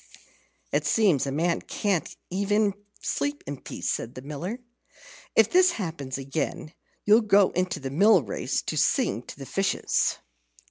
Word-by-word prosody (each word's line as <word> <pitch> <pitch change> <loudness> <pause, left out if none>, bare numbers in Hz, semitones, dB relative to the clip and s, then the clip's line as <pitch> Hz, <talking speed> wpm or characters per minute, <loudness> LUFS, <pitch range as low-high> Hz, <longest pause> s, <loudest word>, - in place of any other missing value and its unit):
"It - - +1
seems 180 - +3
a - - -2
man 165 +4 0
can't 195 -5 -2
even 200 +2 +1 0.3
sleep 285 0 -2
in 140 -2 -6
peace," - - -6
said 115 - -2
the 130 - -8
Miller. 150 - -5 0.8
"If 225 -1 +5
this 365 -1 +5
happens 160 - -4
again, 140 +3 -4 0.3
you'll 215 +3 +6
go 205 -3 +4
into 180 -2 -1
the 135 -2 -5
mill 195 +2 +5
race 100 - -2
to - - -3
sing 105 +4 +2
to - - -11
the 135 - -8
fishes." 195 +9 0
175 Hz, 150 wpm, -26 LUFS, 140-205 Hz, 0.8 s, you'll